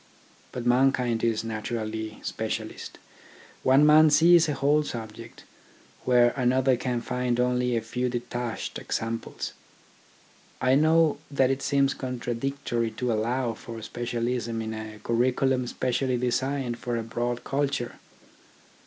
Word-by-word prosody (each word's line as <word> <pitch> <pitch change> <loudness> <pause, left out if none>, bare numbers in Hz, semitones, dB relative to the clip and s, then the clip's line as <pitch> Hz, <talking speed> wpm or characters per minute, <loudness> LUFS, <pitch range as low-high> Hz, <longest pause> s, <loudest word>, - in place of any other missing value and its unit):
But 125 - -5
mankind 125 -2 +2
is 115 -2 +1
naturally 110 -1 -4
specialist. - - -4 0.6
One 135 +3 +5
man 155 +1 +7
sees 165 +2 +6
a 145 - 0
whole 145 +3 +3
subject, 115 -4 -8 0.6
where 120 -1 +5
another 130 0 +3
can 125 -1 -2
find 125 0 -1
only 125 -1 +1
a - - 0
few 125 +3 -2
de 120 0 -1
tached 120 -1 -4
examples. 115 +1 -4 1.1
I 130 +1 +3
know 155 +1 +4
that 135 -2 +2
it 135 0 -2
seems 140 -1 +2
contra 125 -2 -4
dictory 120 -2 -2
to 125 -2 0
allow 120 +2 0
for 115 +1 -9
specialism 120 0 -2
in 110 0 -4
a 110 -1 -7
curriculum 125 +2 +1
especially 125 +1 -1
designed 125 0 -1
for 120 -1 -2
a 115 - -2
broad 120 +2 -3
culture. 140 -3 -2
125 Hz, 130 wpm, -26 LUFS, 115-135 Hz, 1.1 s, man